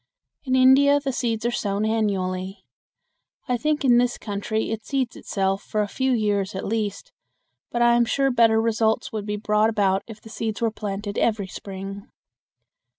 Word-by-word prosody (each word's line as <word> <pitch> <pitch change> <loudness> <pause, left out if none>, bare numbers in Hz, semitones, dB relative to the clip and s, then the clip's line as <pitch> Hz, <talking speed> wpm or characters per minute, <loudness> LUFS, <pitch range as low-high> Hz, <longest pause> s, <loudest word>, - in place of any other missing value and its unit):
In 260 -1 +1
India 270 +2 +6
the 275 -2 -3
seeds 230 -2 -2
are 240 - +1
sown 205 -2 -1
annually. 195 -3 -1 0.8
I 250 - +1
think 300 +3 0
in 240 -2 +6
this 245 0 +1
country 215 +1 -3
it 225 -1 -4
seeds 265 -2 -2
itself 195 -1 -1
for 215 - -2
a - - -3
few 260 +5 -1
years 205 -4 0
at 190 - -4
least, 210 -2 -3 0.6
but 240 0 0
I 240 0 +5
am 235 0 +4
sure 270 +3 +1
better 230 -2 +4
results 225 0 +1
would 215 -1 -5
be 210 0 -2
brought 210 +1 +2
about 195 -3 +1
if 220 -2 -10
the 220 - -14
seeds 220 -1 -4
were 230 -1 +1
planted 205 -1 -4
every 215 -3 +1
spring. 195 +1 -8
220 Hz, 175 wpm, -24 LUFS, 200-240 Hz, 0.8 s, India